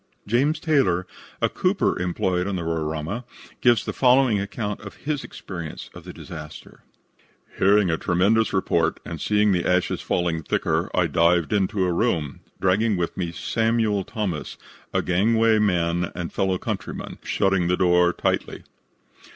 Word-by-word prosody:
James 135 +9 +1
Taylor, 135 - +2 0.4
a - - +5
cooper - - 0
employed 90 +1 0
on 100 - -2
the 90 - -3
Roraima, 80 +6 -3 0.4
gives 120 -3 +4
the - - -3
following 125 -4 +4
account 105 +1 -4
of 100 - -10
his 145 -2 -1
experience 85 -5 -8
of - - -12
the - - -7
disaster: 75 -1 -10 0.8
"Hearing 100 -1 +4
a 80 - -1
tremendous 100 +6 +2
report 85 -4 +1
and 80 -3 -6
seeing 105 0 +2
the 90 -2 +1
ashes 90 0 +1
falling 85 -2 -1
thicker, - - -1
I - - +3
dived 85 +2 +2
into 95 -1 +1
a 90 - 0
room, 85 - -1 0.2
dragging 100 +3 +2
with 85 -1 -2
me 85 -3 -3
Samuel 110 +1 0
Thomas, 95 -8 -4 0.3
a - - 0
gangway 110 +4 +3
man 85 -4 +1
and 85 -1 -5
fellow 95 -2 0
countryman, - - -5
shutting 95 -3 +1
the 90 +1 +1
door 90 -1 +4
tightly. - - -2
95 Hz, 150 wpm, -24 LUFS, 85-110 Hz, 0.8 s, a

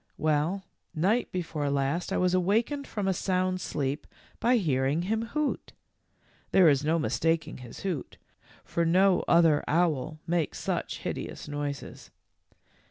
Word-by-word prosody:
Well, 155 +5 +1 0.3
night 200 +10 +1
before 160 -5 -2
last 140 +5 -1
I - - +1
was 180 0 +2
awakened 225 +10 +1
from 205 -3 -3
a 190 - +3
sound 185 0 0
sleep 140 -2 -3 0.3
by 245 +1 +3
hearing 145 - +1
him 220 +4 0
hoot. 295 +5 -2 0.8
There 185 -3 +6
is 145 -2 +4
no 160 +3 +2
mis 155 - -1
taking 165 -3 0
his 120 -2 -10
hoot, 180 -8 -4 0.5
for 170 - -1
no 185 +3 +4
other 165 -3 +5
owl 155 -2 +1
makes 170 -2 -1
such - - -2
hideous - - -5
noises. 145 -1 -5
170 Hz, 140 wpm, -28 LUFS, 145-190 Hz, 0.8 s, There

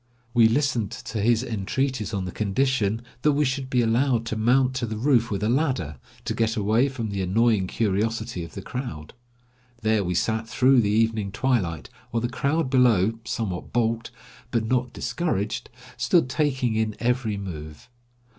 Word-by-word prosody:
We 115 -2 +6
listened 120 -3 +1
to 110 - -5
his 115 +2 +3
entreaties 120 +1 -2
on 100 -4 -2
the 90 - -4
condition 110 +1 0 0.2
that 150 +2 +3
we 150 +1 +2
should 130 0 -2
be 125 -2 +2
allowed 115 +1 +2
to 110 - -3
mount 125 +4 +3
to 120 -2 -2
the 110 0 -4
roof 120 -1 +3
with 100 0 -2
a - - +2
ladder, 120 - 0 0.3
to - - -1
get 115 0 0
away 110 +6 +2
from 115 -5 -4
the 100 -1 -2
annoying 105 +1 +2
curiosity 110 0 -1
of 85 - -10
the - - -6
crowd. 80 - -6 0.7
There 110 -1 +2
we 90 -1 -2
sat 110 +4 0
through 130 +3 +4
the 105 - 0
evening 110 -2 +1
twilight, 100 - 0 0.2
while 115 - -1
the 120 - -1
crowd 140 +4 0
below, 115 -4 +3
somewhat 105 -5 -3
balked, 115 -1 0 0.4
but 115 -2 0
not 125 +1 0
discouraged, 130 - -2 0.3
stood 125 +4 +3
taking 130 -5 0
in 110 -1 0
every 120 -3 0
move. 80 -2 -8
115 Hz, 170 wpm, -25 LUFS, 105-125 Hz, 0.7 s, We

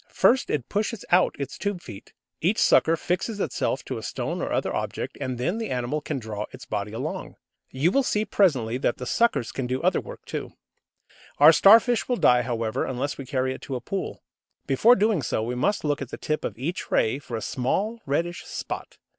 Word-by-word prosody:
First, 260 +2 +3
it 140 -5 -1
pushes 215 +1 -2
out 180 +1 +4
its 140 -1 -5
tube 200 -3 -2
feet. 110 - -11 0.3
Each 190 +7 +2
sucker 165 +1 +4
fixes 190 +6 -2
itself - - -1
to - - -4
a - - -9
stone - - -3
or - - -3
other - - 0
object, - - -3
and 130 -1 -2
then 175 - -1
the 225 - -3
animal 125 +4 -2
can 150 -1 -3
draw 110 -3 -5
its - - -11
body 105 0 -3
along. 115 - -5 0.3
You 145 +7 +1
will 275 - +3
see 215 -4 0
presently 130 - +2
that 120 - 0
the 125 - -6
suckers 140 - +1
can 130 -2 -3
do 130 +1 -1
other - - +2
work - - -11
too. - - -5 0.8
Our 150 +3 +9
Starfish 225 +7 +6
will 250 - +2
die, 125 - +5
however, 115 0 -2
unless 130 +3 -3
we 135 - -7
carry 130 -1 0
it - - -10
to 135 - -5
a - - -2
pool. 190 +11 -5 0.4
Before 220 - +5
doing 210 -5 +2
so, 110 -2 -1
we 120 +2 -2
must 200 +12 0
look 145 -2 0
at 135 - -5
the - - -6
tip 155 0 -2
of 105 - -4
each 165 +9 -4
ray 120 +5 +2
for 120 -5 -5
a - - -5
small 205 - -1
reddish 170 +5 -1
spot. - - -6
140 Hz, 210 wpm, -25 LUFS, 125-195 Hz, 0.8 s, Our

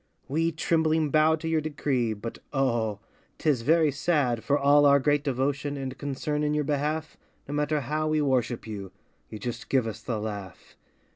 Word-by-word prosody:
We 165 +4 +1
trembling 160 -1 +1
bow 155 +1 +4
to 160 +1 -6
your 160 -1 +1
decree, 140 -6 -1
But 110 +3 -7
oh! 115 -7 0 0.4
'Tis 145 -7 +1
very 155 +4 +3
sad 140 -5 0
For 145 - +2
all 145 +1 +5
our 140 0 +6
great 145 +1 +2
devotion 140 +1 -1
And 135 -1 -4
concern 145 +2 -3
in 150 0 +1
your 150 - +1
behalf, 150 +2 -2 0.3
No 140 - -5
matter 150 0 0
how 155 +4 -1
we 155 0 +1
worship 130 -4 0
you, 100 -4 -7 0.4
You 110 - -7
just 115 +3 -6
give 130 -4 +2
us 110 - -5
the 115 -3 -3
laugh. 100 -3 -7
145 Hz, 180 wpm, -27 LUFS, 125-155 Hz, 0.4 s, our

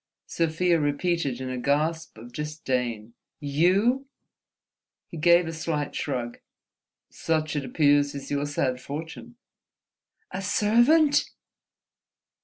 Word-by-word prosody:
Sofia 165 +1 +1
repeated 145 -2 -1
in 130 0 -4
a 130 - -4
gasp 155 +3 -1
of 120 +2 -12
disdain—"you!" 150 - -1 1.0
He 170 - -10
gave 170 +2 +5
a 165 - -5
slight 155 -2 -3
shrug. 125 -4 -3 0.7
"Such, 155 -1 -1
it 145 - -1
appears, 145 +1 +2
is 140 - -7
your 145 0 -1
sad 130 -3 -1
fortune." 160 - -7 1.0
"A 190 - -4
servant!" 240 - +3
150 Hz, 100 wpm, -26 LUFS, 140-170 Hz, 1.0 s, gave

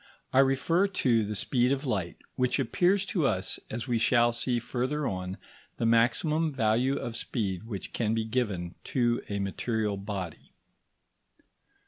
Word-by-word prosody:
I 130 - +5
refer 140 +8 +3
to 125 - +2
the 105 +1 -3
speed 125 +4 +1
of 140 +1 -1
light, 95 -9 -2 0.2
which 125 -1 +1
appears 180 - +2
to 175 -9 +1
us, 95 -5 0
as 110 0 -4
we 120 -2 +1
shall 120 +1 +4
see 120 +1 0
further 130 +5 -2
on, 95 -3 -3 0.4
the 115 - 0
maximum 140 +8 +3
value 125 +1 +2
of 115 - -4
speed 105 -5 -3
which 100 -5 -6
can 110 -1 0
be 110 -1 0
given 105 -7 -2
to 120 -2 +1
a 100 - -2
material 105 +1 -1
body. 100 -4 -6
120 Hz, 150 wpm, -29 LUFS, 105-135 Hz, 0.4 s, I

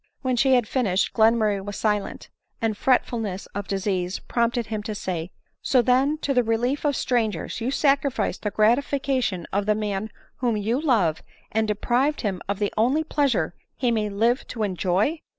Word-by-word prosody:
When 255 -1 +1
she 260 +2 +4
had 245 -3 +2
finished, 200 -8 0
Glenmurray 220 -3 +3
was 205 0 -6
silent; 210 -2 -2 0.3
the 225 - +1
freftulness 220 -4 0
of 200 0 -4
disease 190 -2 -1
prompted 235 0 -1
him 215 -1 -4
to 215 0 -5
say, 175 -3 -4
" - - -45
So 255 -2 +3
then, 265 +5 +3
to 275 - +1
the 250 - +4
relief 240 +6 0
of 290 -2 +2
strangers 225 -5 -1
you 235 - -1
sacrificed 275 - +1
the 210 - -1
gratification 240 -3 +1
of 200 +1 0
the 210 - +3
man 210 0 -2 0.3
whom 240 -4 0
you 225 +6 0
love, 210 - +2 0.3
and 220 0 +1
deprived 245 +7 +1
him 195 -5 -2
of 200 - 0
the 205 0 -1
only 260 +8 +2
pleasure 270 - 0 0.2
he 245 -2 0
may 215 -2 0
live 230 +5 +1
to 225 -3 -3
enjoy 195 - 0
220 Hz, 175 wpm, -24 LUFS, 205-255 Hz, 0.3 s, she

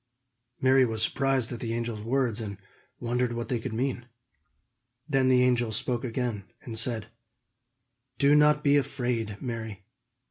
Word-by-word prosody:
Mary 130 0 +5
was 110 -3 +1
surprised 135 -3 +1
at 120 - -5
the 115 -1 -3
angel's 115 -2 -3
words, 120 -1 0
and 100 -3 -5 0.4
wondered 120 0 0
what 120 0 -4
they 125 - 0
could 120 +2 -5
mean. 120 +1 -2 1.0
Then 135 -4 +2
the 125 -1 +5
angel 120 -2 +2
spoke 120 +3 -1
again, 120 -5 -3 0.2
and 115 - -7
said: 110 -1 -1 1.1
"Do 140 +1 +4
not 150 0 +5
be 145 0 +5
afraid, 120 -6 -2
Mary. 110 -6 -5
120 Hz, 145 wpm, -28 LUFS, 115-130 Hz, 1.1 s, Mary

